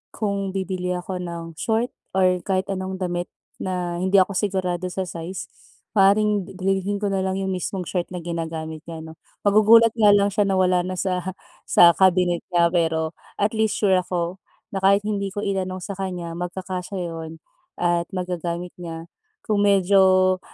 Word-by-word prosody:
kung 200 -2 -2
bibili 185 -1 -2
ako 180 +1 -4
ng 170 -1 -5 0.2
short 225 +2 0 0.2
or 185 -1 +3
kahit 190 0 0
anong 190 0 -3
damit 175 -1 -3 0.3
na 180 -2 -3
hindi 190 +2 0
ako 190 0 +5
sigurado 185 -3 -1
sa 190 +1 -3
size, 175 +1 -7 0.4
maaaring 205 -1 +3
dalhin 195 +2 0
ko 200 - +1
na 195 - 0
lang 190 0 -1
yung 195 0 -2
mismong 185 0 -3
short 175 0 -2
na 175 - -5
ginagamit 160 -2 -4
niya, 160 -1 -7
'no. 160 0 -11 0.2
Magugulat 215 +3 +6
nga 210 -3 +5
lang 200 0 +3
siya 205 0 +1
na 195 - +1
wala 185 -1 +2
na 185 - -3
sa 185 0 -2 0.3
sa 170 - +7
cabinet 180 -1 +3
niya, 170 -2 +3
pero 160 -2 +1 0.2
at 205 +1 +1
least 220 -2 0
sure 190 -3 +3
ako 180 0 -3 0.3
na 195 - -2
kahit 200 +1 +4
hindi 205 -2 -1
ko 205 - -2
itanong 185 -2 -2
sa - - -5
kanya, 180 -3 -4
magkakasya 180 +2 -5 0.2
iyon 160 -1 -6 0.4
at 175 0 0
magagamit 180 -1 -3
niya. 165 -1 -7 0.3
Kung 210 -2 0
medyo, 185 -1 +4
185 Hz, 165 wpm, -23 LUFS, 175-195 Hz, 0.4 s, sa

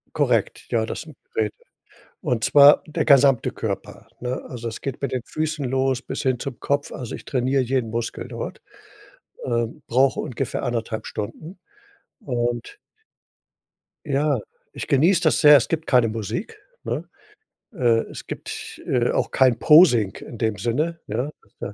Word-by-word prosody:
Korrekt, - - 0
ja, 110 -1 +1
das - - -5
sind 155 -2 -13 0.2
Geräte. 110 -2 0 0.7
Und 115 -2 -1
zwar 145 0 +7
der 155 - -2
gesamte 135 -3 +5
Körper, - - -5
ne? 125 +1 -3
Also 120 -2 -5
es 115 - -7
geht 135 -1 -5
mit 135 -2 -2
den 130 - -1
Füßen 155 -1 -3
los 130 0 0
bis - - -5
hin 130 -3 +1
zum 130 0 -6
Kopf. 140 0 -1
Also 125 -4 -6
ich - - -8
trainiere 130 0 +1
jeden 125 -2 -1
Muskel 115 0 -4
dort, - - -6 0.8
ähm, 120 +3 -2
brauche 130 +3 +2
ungefähr 125 - -3
1,5 115 -3 -3
Stunden. 155 - -7 0.6
Und 120 - -3 1.3
ja, 145 -1 +1 0.3
ich - - -6
genieße 170 +6 +3
das 155 - +3
sehr, 150 0 +9
es 125 - +1
gibt 160 -1 -2
keine 125 -3 +4
Musik, 115 - -5 0.3
ne? - - -3 0.7
Äh, 120 - +3
es - - -9
gibt, - - -7
äh, - - +2
auch - - -1
kein 130 -3 +3
Posing 150 - +6
in 115 - -10
dem 110 -3 -1
Sinne, 150 - -1
ja, 135 +4 -2 0.3
äh. 100 - -5
130 Hz, 155 wpm, -23 LUFS, 115-145 Hz, 1.3 s, sehr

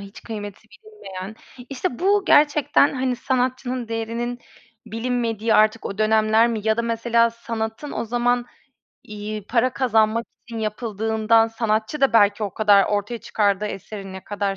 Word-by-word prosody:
hiç 200 +1 -12
kıymeti 210 -1 -8
bilinmeyen. 220 - -10 0.3
İşte, 255 -2 -3
bu 400 +2 +2
gerçekten, 290 -1 +4
hani, 255 -1 -1
sanatçının 255 -1 -2
değerinin 230 +2 -3 0.5
bilinmediği 230 -1 -1
artık 215 +1 +3
o 200 - -6
dönemler 220 +1 +3
mi 225 -2 -2
ya 220 0 +2
da, 235 - 0
mesela, 230 0 +2
sanatın 230 +3 -5
o - - -3
zaman, 240 +1 0 0.6
iii, 210 -1 -7
para 245 +1 +1
kazanmak 225 -3 +1 0.2
için 230 -1 -7
yapıldığından 220 +1 +1
sanatçı 225 +4 -1
da 270 - +3
belki 205 -1 +4
o 200 -3 -3
kadar 205 -2 +5
ortaya 210 +3 -2
çıkardığı 205 -2 0
eserin 195 -1 -7
ne 190 0 -9
kadar 200 -1 -2
225 Hz, 145 wpm, -22 LUFS, 215-240 Hz, 0.6 s, kadar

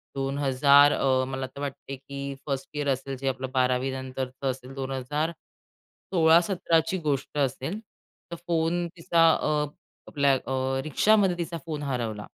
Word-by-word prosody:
2000 140 +1 +4
अ, 130 -1 +2
मला 130 0 -3
तर 140 - -12
वाटते 135 -1 -5
की 140 +1 -7
फर्स्ट 135 -2 -3
इयर 145 -1 -2
असेल 135 0 -2
जे 135 - -4
आपलं 130 0 -3
बारावीनंतरचं 130 +1 -1
असेल 130 +1 -10
2000 135 +4 -2 0.8
16-17 170 0 +4
ची 185 - -1
गोष्ट 150 -3 -2
असेल. 140 - -1 0.5
तर - - -3
फोन 170 +1 +1
तिचा 165 0 +4
अ, 150 -1 0 0.4
आपल्या 140 -2 +2
अ, 130 0 -1
रिक्षामध्ये 190 +3 +3
तिचा 170 0 -3
फोन 155 -3 -4
हरवला. 115 -6 -3
140 Hz, 135 wpm, -26 LUFS, 130-160 Hz, 0.8 s, 2000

